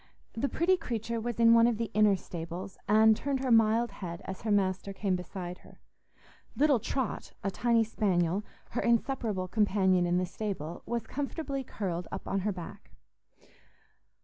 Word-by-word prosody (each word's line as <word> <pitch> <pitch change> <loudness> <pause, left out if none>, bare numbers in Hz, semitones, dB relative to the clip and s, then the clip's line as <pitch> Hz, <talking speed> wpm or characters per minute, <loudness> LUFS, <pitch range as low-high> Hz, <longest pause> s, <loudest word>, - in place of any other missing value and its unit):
The 270 +5 -1
pretty 370 +3 +2
creature 230 - -3
was 235 0 -4
in 230 0 +7
one 230 0 +6
of 235 -2 +1
the 230 0 -3
inner 210 -1 +5
stables, 175 +2 -7
and 220 +1 +6
turned 275 +3 -2
her 260 -2 0
mild 225 0 +4
head 175 -4 -7
as 190 - -6
her 220 - -2
master 195 -1 +1
came 195 -1 0
beside 180 0 -6
her. - - -18 0.8
Little 285 -4 +4
Trot, 245 +2 -3
a 195 - 0
tiny 235 +2 +2
spaniel, 195 -4 0 0.3
her 240 - -1
inseparable 230 -5 0
companion 190 -3 +2
in 175 +1 +2
the 185 - +1
stable, 180 -4 -5
was 235 -1 -2
comfortably 275 +1 -3
curled 180 -7 -4
up 190 - -6
on 195 - 0
her 205 +2 0
back. 195 +2 -9
210 Hz, 165 wpm, -30 LUFS, 185-235 Hz, 0.8 s, in